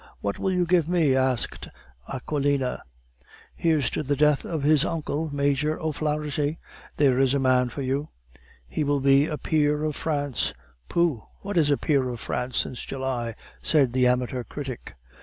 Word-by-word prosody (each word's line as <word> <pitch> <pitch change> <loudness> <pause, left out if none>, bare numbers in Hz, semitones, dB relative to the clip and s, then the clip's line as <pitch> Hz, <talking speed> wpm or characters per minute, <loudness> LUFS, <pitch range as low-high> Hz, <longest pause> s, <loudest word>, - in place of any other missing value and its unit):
What 100 0 -3
will 190 - 0
you 180 -1 +2
give 170 -2 +2
me?" 160 -7 +3
asked 130 -2 0 0.4
Aquilina. 140 -1 -1 0.7
"Here's 155 -6 +1
to - - -1
the 145 -1 0
death 150 0 +3
of 160 -4 -3
his 150 0 +5
uncle, 160 -2 -2
Major 145 +2 0
O'Flaharty! 150 -1 -1 0.4
There 135 -3 +4
is 135 0 +3
a - - +2
man 130 -1 +3
for 140 +3 -5
you." 135 +4 -1 0.6
"He - - -2
will 145 -1 +1
be 135 +2 +4
a 150 - -3
peer 150 +1 +1
of 155 -2 -1
France." 145 - -1 0.3
"Pooh! 165 -10 +1 0.2
what 200 0 -4
is 155 -4 +4
a 145 - +3
peer 140 -5 +1
of 120 -2 -5
France 125 +2 -3
since 125 - -2
July?" 130 -4 -3 0.3
said 140 -6 +3
the 125 -1 +4
amateur 125 0 0
critic. 130 - -7
145 Hz, 165 wpm, -25 LUFS, 130-155 Hz, 0.7 s, his